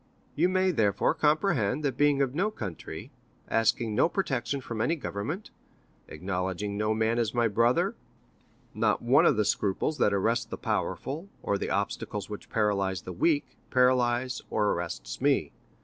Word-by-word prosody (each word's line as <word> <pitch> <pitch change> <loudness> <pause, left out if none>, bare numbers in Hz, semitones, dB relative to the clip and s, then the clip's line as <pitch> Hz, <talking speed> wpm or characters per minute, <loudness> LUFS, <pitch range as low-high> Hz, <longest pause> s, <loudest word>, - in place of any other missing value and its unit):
You 170 +5 +2
may, 185 0 +2
therefore, 105 - +2
comprehend, 150 - +1
that 135 -3 0
being 145 0 +3
of 130 -2 -2
no 190 +8 +1
country, 100 - -7 0.4
asking 115 0 +1
no 130 +9 +3
protection 140 -8 -1
from 115 -4 -5
any 160 +8 +2
government, 150 - -5 0.6
acknowledging 95 +4 -3
no 105 +1 0
man 110 +2 +1
as 115 0 -1
my 120 -1 +3
brother, 115 +3 +2 0.8
not - - +1
one 125 +4 +5
of 130 - +3
the 105 - +2
scruples 100 +11 0
that 105 - +4
arrest 105 +4 +1
the - - -5
powerful, 160 +8 -3
or 100 - 0
the - - -3
obstacles 100 0 -3
which 105 - -8
paralyze 100 -4 0
the 90 - -6
weak, 145 - 0
paralyzes 125 0 +2
or 105 -1 +1
arrests 85 -8 -4
me. - - +2
115 Hz, 155 wpm, -28 LUFS, 100-145 Hz, 0.8 s, one